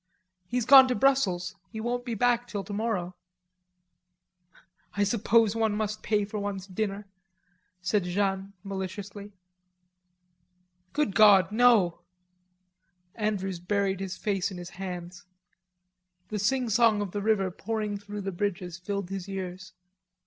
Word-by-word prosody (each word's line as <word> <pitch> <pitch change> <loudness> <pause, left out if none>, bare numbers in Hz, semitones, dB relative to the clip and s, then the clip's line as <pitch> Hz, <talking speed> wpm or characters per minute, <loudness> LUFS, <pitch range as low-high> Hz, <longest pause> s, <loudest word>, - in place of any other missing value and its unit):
"He's 245 +1 -1
gone 265 +1 +9
to 250 - 0
Brussels. 205 -8 +1
He 220 - -7
won't 245 +2 -2
be 235 -2 -3
back 245 +2 +2
till 205 -4 -4
tomorrow." 205 -4 -2 1.8
"I 205 - +3
suppose 225 +1 +3
one 220 -2 +1
must 215 0 -2
pay 210 -2 +1
for 210 +1 -5
one's 200 -2 -4
dinner," 200 +1 -3 0.8
said 185 +1 +1
Jeanne 195 +1 -1
maliciously. 200 +1 -6 1.6
"Good 295 -9 0
God, 200 -3 +6
no." 215 -7 +4 1.1
Andrews 195 -4 -2
buried 195 +1 0
his 190 -1 -5
face 195 -3 -1
in 190 - -8
his 175 +1 -8
hands. 180 -2 -7 1.0
The 215 - -3
singsong 225 -1 +2
of 195 - -6
the 205 - -3
river 200 -3 +1
pouring 210 +1 -3
through 205 0 -7
the 195 0 -3
bridges, 180 -2 -3
filled 200 0 -4
his 195 0 -5
ears. 185 -1 -6
205 Hz, 125 wpm, -28 LUFS, 190-220 Hz, 1.8 s, gone